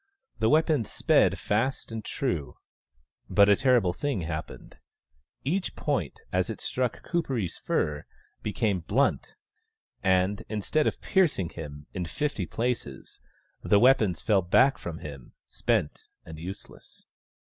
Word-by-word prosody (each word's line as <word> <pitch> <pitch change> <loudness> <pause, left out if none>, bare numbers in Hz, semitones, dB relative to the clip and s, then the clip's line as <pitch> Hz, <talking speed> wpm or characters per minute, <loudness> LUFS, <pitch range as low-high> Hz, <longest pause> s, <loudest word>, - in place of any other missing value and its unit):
The 110 0 +3
weapons 155 -6 +2
sped - - +3
fast 115 +4 -1
and 110 -1 -5
true. 80 - -3 0.7
But 100 0 +5
a 100 - +7
terrible 120 -7 +3
thing 140 -3 -2
happened. 80 -1 -6 0.6
Each 180 +8 -1
point, 130 - -2
as - - +1
it - - -5
struck 125 -2 -2
Kuperee's 135 - -1
fur, 75 -1 -1 0.3
became 105 -2 0
blunt, 115 +12 0 0.7
and, 95 +2 +2
instead 110 +8 0
of - - -2
piercing 155 - +2
him 75 -4 -8
in 90 -3 -3
fifty 110 - -2
places, 115 - -4 0.4
the 100 - +4
weapons 110 -9 +4
fell 105 -3 +3
back 115 +10 +4
from 85 -2 -6
him, 70 -5 -10
spent 75 - -1 0.2
and 80 -1 -9
useless. 90 +4 -10
105 Hz, 125 wpm, -27 LUFS, 85-130 Hz, 0.7 s, a